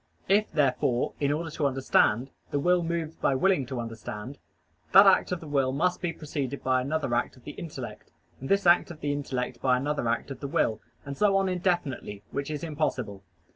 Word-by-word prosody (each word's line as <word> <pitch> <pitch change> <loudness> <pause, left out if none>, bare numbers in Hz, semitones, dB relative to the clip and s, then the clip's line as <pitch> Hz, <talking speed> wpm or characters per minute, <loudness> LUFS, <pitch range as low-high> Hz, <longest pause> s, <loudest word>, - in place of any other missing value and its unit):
If, 205 +3 +3
therefore, 130 -3 +1
in 145 -1 +1
order 160 +2 -2
to 150 -2 0
understand, 130 -2 +2 0.2
the - - -1
will 180 +4 +3
moves 165 -1 -3
by 135 - +1
willing 145 -3 +2
to 130 -2 -4
understand, 115 +2 -7 0.5
that 195 +1 +10
act 195 - +5
of 180 - -2
the 160 - -9
will 135 -3 +1
must 180 +7 0
be 175 -2 -1
preceded 140 -4 -4
by 130 -1 +2
another 140 -1 -1
act 120 - -1
of 125 - -19
the - - -7
intellect, 160 +1 -8 0.3
and 135 - -7
this 200 0 +2
act 175 +1 +5
of 165 -3 -10
the 145 - 0
intellect 135 -3 -3
by 125 -1 +3
another 145 -1 -1
act 115 +4 -1
of 135 - -7
the 140 - -4
will, 125 -8 0 0.2
and 140 0 -5
so 200 +3 +3
on 195 0 +2
indefinitely, 175 - -2
which 140 +1 -3
is 150 0 -4
impossible. 130 -11 -2
145 Hz, 205 wpm, -27 LUFS, 130-170 Hz, 0.5 s, that